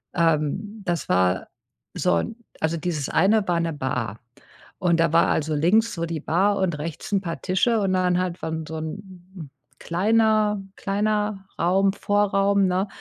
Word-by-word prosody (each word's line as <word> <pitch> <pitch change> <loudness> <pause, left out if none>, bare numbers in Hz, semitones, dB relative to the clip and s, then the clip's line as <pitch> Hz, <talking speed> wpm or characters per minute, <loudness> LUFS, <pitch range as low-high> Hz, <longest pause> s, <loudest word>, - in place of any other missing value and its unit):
ähm, 170 +6 0
das 175 -2 -2
war 90 0 +2 0.5
so 85 - +2
'n, 220 - -3 0.3
also 160 +1 0
dieses 160 -4 -2
eine 200 +4 +3
war 175 -1 +1
'ne 165 0 -1
Bar. 125 -6 -3 0.6
Und 170 -3 +2
da 165 -1 +2
war 165 - +5
also 155 0 0
links 210 +10 +3
so 170 -1 -2
die 165 -1 -3
Bar 195 +6 +1
und 180 -5 0
rechts 160 +4 -6
'n 195 - +2
paar 170 -3 -5
Tische 210 +5 +1
und 190 -1 +1
dann 180 -1 +2
halt 180 -1 -3
war 160 - -2 0.2
so 160 - -5
'n 180 -1 -9 0.3
kleiner, 215 +2 +2 0.2
kleiner 210 0 -1
Raum, 190 +3 +3
Vorraum, 200 -1 +2
ne, 185 +2 0
180 Hz, 160 wpm, -24 LUFS, 165-200 Hz, 0.6 s, war